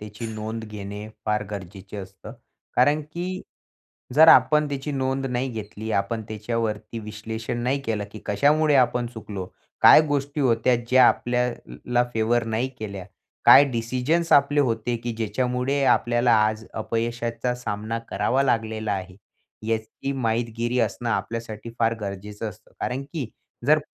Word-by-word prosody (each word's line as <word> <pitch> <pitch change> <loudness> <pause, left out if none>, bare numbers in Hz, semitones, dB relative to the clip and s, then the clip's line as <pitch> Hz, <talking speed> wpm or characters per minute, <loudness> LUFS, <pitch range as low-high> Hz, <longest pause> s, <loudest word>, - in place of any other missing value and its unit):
त्याची 105 +2 -7
नोंद 110 +1 -5
घेणे 105 0 -7 0.2
फार 105 -1 +1
गरजेचं 100 0 -7
असतं. 95 +1 -11 0.4
कारण, 145 +4 +4
की 175 +5 -5 0.7
जर 160 +2 +8
आपण 150 +4 +6
त्याची 140 +1 -4
नोंद 135 0 -1
नाही 125 +1 -1
घेतली, 110 0 -6
आपण 100 +3 -1
त्याच्यावरती 110 0 -3
विश्लेषण 110 +2 -5
नाही 135 +3 0
केलं, 110 -5 -2
की 110 - -9
कशामुळे 145 +7 +3
आपण 125 -2 +2
चुकलो, 105 -5 -7 0.3
काय - - +9
गोष्टी 145 0 -1
होत्या 120 -1 +3
ज्या 130 0 +7
आपल्याला 125 0 -1
फेव्हर 115 +1 +2
नाही 115 +3 -1
केल्या. 100 -3 -6 0.4
काय 140 - +9
डिसिजन्स 130 +9 0
आपले 145 +1 +5
होते, 120 -2 0
की 120 +1 -4
ज्याच्यामुळे 125 +5 -1
आपल्याला 120 -1 +3
आज 110 +1 -3
अपयशाचा 115 +2 -2
सामना 115 -1 -4
करावा 135 +2 +1
लागलेला 110 -4 0
आहे, 95 -1 -5 0.5
याची 115 +5 -2
माहितगीरी 120 -1 -1
असणं 115 +1 -1
आपल्यासाठी 115 -1 -4
फार 115 0 +2
गरजेचं 105 +2 -5
असतं. 105 +2 -14
कारण, 130 +2 -2
की 150 -7 -3 0.4
जर 155 +1 +6
115 Hz, 135 wpm, -24 LUFS, 110-130 Hz, 0.7 s, काय